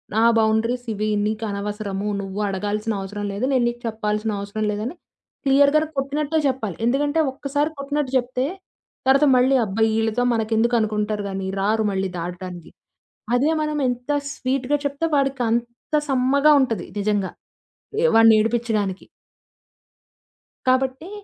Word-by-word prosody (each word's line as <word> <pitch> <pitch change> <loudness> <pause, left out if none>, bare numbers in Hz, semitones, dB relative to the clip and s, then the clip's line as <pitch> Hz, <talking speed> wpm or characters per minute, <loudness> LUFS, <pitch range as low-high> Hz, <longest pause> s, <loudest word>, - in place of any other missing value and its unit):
నా 220 - +3 0.2
బౌండరీస్ 225 +3 +1
ఇవి. 215 +1 -2 0.2
నీకనవసరము 210 -1 -3
నువ్వు 195 +1 -6
అడగాల్సిన 210 +3 -2
అవసరం 205 +2 -5
లేదు 215 +6 -1
నేను 255 -2 +3
నీకు 240 0 -8
చెప్పాల్సిన 215 0 -2
అవసరం 200 +2 -3
లేదని 220 +10 -4 0.5
క్లియర్‌గానే 285 +3 +4
కొట్టినట్టే 295 +3 0
చెప్పాలి. 225 -9 -2
ఎందుకంటే 290 +5 +1
ఒక్కసారి 290 +3 -1
కొట్టినట్టు 280 -1 -2
జెప్తే 255 +2 -1 0.6
తర్వాత 275 +3 +5
మళ్ళీ 260 +2 +4
అబ్బా! 215 +2 0 0.2
ఇళ్ళతో 225 +2 0
మనకెందుకనుకుంటారు 220 -2 0
గానీ 190 0 -4 0.2
రారు 215 +2 +1
మళ్ళీ 195 0 -1
దాటడానికి. 175 0 -7 0.6
అదే 280 +5 +2
మనం 305 0 -2
ఎంత 245 +3 -3 0.2
స్వీట్‌గా 265 +2 -1
చెప్తే 285 +4 -1
వాడికంత 240 -1 -1
సమ్మగా 275 +3 +4
ఉంటది 225 -8 -1
నిజంగా, 205 -2 0 0.7
ఏ - - +5
వాడిని 225 -1 +7
ఏడిపించడానికి. 215 -4 -1 1.6
కాబట్టి 260 +6 +1
230 Hz, 120 wpm, -22 LUFS, 210-270 Hz, 1.6 s, వాడిని